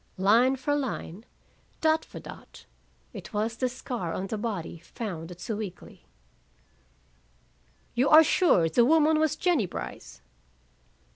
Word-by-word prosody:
Line 230 Hz, +8 st, +4 dB
for 270 Hz, +3 st, -2 dB
line, 235 Hz, -, -4 dB, 0.5 s
dot 315 Hz, 0 st, +2 dB
for -, -, -10 dB
dot, -, -, -13 dB, 0.5 s
it -, -, -10 dB
was 220 Hz, +2 st, -1 dB
the 255 Hz, +2 st, -1 dB
scar 240 Hz, -8 st, -5 dB
on 185 Hz, -, -3 dB
the 215 Hz, +3 st, -4 dB
body 200 Hz, -7 st, -4 dB
found 170 Hz, -2 st, -7 dB
at 175 Hz, -, -10 dB
Sewickley. 205 Hz, 0 st, -7 dB, 1.9 s
"You 250 Hz, +4 st, +2 dB
are 310 Hz, +1 st, +9 dB
sure 290 Hz, -, +3 dB
the 200 Hz, +9 st, +3 dB
woman 310 Hz, +3 st, +4 dB
was 315 Hz, -2 st, +1 dB
Jennie 330 Hz, -, +1 dB
Brice?" 60 Hz, -, -8 dB
230 Hz, 130 wpm, -27 LUFS, 190-290 Hz, 1.9 s, are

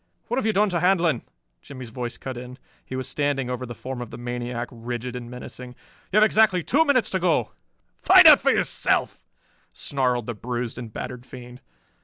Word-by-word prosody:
"What 240 Hz, -, -1 dB
have 225 Hz, -, -1 dB
you -, -, +3 dB
done 210 Hz, 0 st, +2 dB
to 175 Hz, -, 0 dB
Handlon?" 170 Hz, -7 st, +2 dB, 0.4 s
Jimmie's 130 Hz, -4 st, -10 dB
voice 120 Hz, -1 st, -5 dB
cut 130 Hz, +1 st, -6 dB
in. 125 Hz, +1 st, -9 dB, 0.3 s
He 130 Hz, -, -7 dB
was 130 Hz, -1 st, -4 dB
standing 135 Hz, -2 st, -1 dB
over 125 Hz, 0 st, -4 dB
the 120 Hz, -, -7 dB
form 130 Hz, +2 st, -6 dB
of 120 Hz, -, -6 dB
the -, -, -9 dB
maniac, 120 Hz, 0 st, -4 dB
rigid 120 Hz, +1 st, -6 dB
and 120 Hz, -1 st, -7 dB
menacing. 125 Hz, 0 st, -9 dB, 0.4 s
"You 205 Hz, -, +2 dB
have 215 Hz, -, +7 dB
exactly 215 Hz, -5 st, +3 dB
two 295 Hz, -, +3 dB
minutes 260 Hz, -7 st, +2 dB
to 190 Hz, -, 0 dB
go." 165 Hz, -, +1 dB, 0.5 s
"Find -, -, +7 dB
out -, -, +9 dB
for -, -, +2 dB
yourself!" -, -, 0 dB, 0.5 s
snarled 125 Hz, -4 st, -1 dB
the 120 Hz, -, -4 dB
bruised 120 Hz, +2 st, -4 dB
and 115 Hz, -3 st, -8 dB
battered 125 Hz, +3 st, -7 dB
fiend. 125 Hz, 0 st, -11 dB
125 Hz, 195 wpm, -24 LUFS, 120-165 Hz, 0.5 s, out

